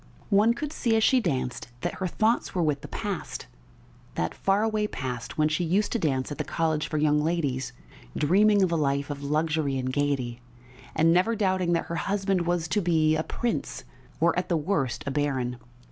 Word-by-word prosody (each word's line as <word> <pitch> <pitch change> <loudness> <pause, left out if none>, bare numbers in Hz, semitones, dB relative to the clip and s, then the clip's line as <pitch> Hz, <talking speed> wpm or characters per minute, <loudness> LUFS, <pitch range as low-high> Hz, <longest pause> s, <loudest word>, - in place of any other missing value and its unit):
One 215 +4 +4
could 300 +4 -4
see 230 -6 +1
as 220 - +3
she 260 - +5
danced 130 - -2
that - - -2
her 185 - +1
thoughts 220 +6 0
were 175 - +2
with 150 -3 0
the - - -8
past, - - -4 0.7
that 80 - -1
faraway 210 +2 +1
past 125 - -5
when 155 0 +4
she 155 +3 0
used 190 +5 +1
to 235 - 0
dance 135 -5 0
at 145 - -6
the - - 0
"College 160 -2 -1
for 155 - -2
Young 150 0 +3
Ladies," 140 -6 -1 0.5
dreaming 200 +6 +4
of 185 - +1
a - - +2
life 140 -2 0
of 140 -1 -6
luxury 150 -1 0
and 130 0 -2
gaiety, 130 -4 -1 0.5
and 165 +1 +4
never 185 +6 +3
doubting 185 -4 +1
that 170 - 0
her 170 - -4
husband 195 -3 0
was 175 -2 0
to 205 +6 +1
be 160 -3 +3
a 155 - +1
prince 235 +8 -3 0.4
or, 165 +1 +3
at 185 - -5
the 170 - +2
worst, 150 -6 -1
a 140 - -2
baron. 135 -4 -1
160 Hz, 195 wpm, -27 LUFS, 140-195 Hz, 0.7 s, she